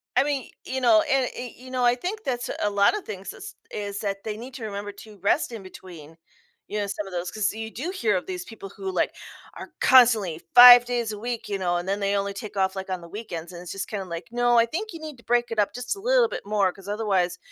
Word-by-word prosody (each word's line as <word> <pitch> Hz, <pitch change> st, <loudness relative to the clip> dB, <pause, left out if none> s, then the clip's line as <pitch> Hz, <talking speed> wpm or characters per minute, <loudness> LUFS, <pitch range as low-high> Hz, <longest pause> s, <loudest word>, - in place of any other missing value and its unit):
I -, -, +5 dB
mean, 280 Hz, -3 st, -1 dB
y -, -, -16 dB, 0.2 s
you 260 Hz, -, -1 dB
know, 320 Hz, +6 st, +6 dB
and, 265 Hz, -2 st, +2 dB
y 245 Hz, -1 st, -6 dB
you 255 Hz, +1 st, -12 dB
know, 255 Hz, -1 st, -1 dB
I 240 Hz, 0 st, +4 dB
think 390 Hz, -, -5 dB
that's 245 Hz, -2 st, -2 dB
a 205 Hz, -, +2 dB
lotta 205 Hz, -, +3 dB
things 195 Hz, -, -7 dB
is -, -, -10 dB, 0.2 s
is 200 Hz, -1 st, -4 dB
that 195 Hz, -1 st, -3 dB
they 215 Hz, -1 st, -4 dB
need 250 Hz, +3 st, -9 dB
to 250 Hz, -, -7 dB
remember 205 Hz, -1 st, -5 dB
to 210 Hz, +1 st, -13 dB
rest 210 Hz, +8 st, +1 dB
in 225 Hz, -4 st, -7 dB
between, 170 Hz, -4 st, -12 dB, 0.5 s
you 210 Hz, -, -3 dB
know, 205 Hz, -, -1 dB
some 200 Hz, +1 st, -4 dB
of 195 Hz, -, -10 dB
those, 175 Hz, 0 st, -3 dB
'cause 215 Hz, -2 st, 0 dB
you 220 Hz, 0 st, -6 dB
do 300 Hz, +12 st, -4 dB
hear 225 Hz, -, 0 dB
of 180 Hz, -, -2 dB
these 180 Hz, -1 st, -5 dB
people 210 Hz, -3 st, -10 dB
who 195 Hz, 0 st, -6 dB
like 185 Hz, -, 0 dB, 0.4 s
are -, -, -10 dB
constantly 225 Hz, -10 st, +5 dB
5 245 Hz, 0 st, +11 dB
days 240 Hz, -3 st, -1 dB
a 210 Hz, -, -6 dB
week, 235 Hz, 0 st, -4 dB
you 200 Hz, -, -1 dB
know, 180 Hz, -2 st, 0 dB
and 175 Hz, +2 st, -4 dB
then 200 Hz, +1 st, 0 dB
they 200 Hz, 0 st, 0 dB
only 200 Hz, 0 st, -1 dB
take 205 Hz, +1 st, -8 dB
off 190 Hz, -1 st, +1 dB
like 190 Hz, 0 st, -5 dB
on 185 Hz, -1 st, -3 dB
the 170 Hz, -, -12 dB
weekends 175 Hz, -5 st, -7 dB
and 175 Hz, -1 st, -9 dB
it's 180 Hz, -, -8 dB
just 195 Hz, -, -4 dB
kinda 200 Hz, -3 st, -4 dB
like, 170 Hz, -1 st, -7 dB
no, 240 Hz, 0 st, +3 dB
I 230 Hz, -, +6 dB
think 390 Hz, -, -4 dB
you 330 Hz, -, -8 dB
need 305 Hz, -4 st, -8 dB
to 235 Hz, -, -19 dB
break 240 Hz, 0 st, +1 dB
it 225 Hz, -, -2 dB
up 205 Hz, -, +1 dB
just 250 Hz, +9 st, -3 dB
a 395 Hz, -, -11 dB
little -, -, +3 dB
bit -, -, -6 dB
more, 200 Hz, -2 st, +1 dB
‘cause 195 Hz, +1 st, -15 dB
otherwise 195 Hz, -4 st, 0 dB
210 Hz, 270 wpm, -25 LUFS, 195-245 Hz, 0.5 s, 5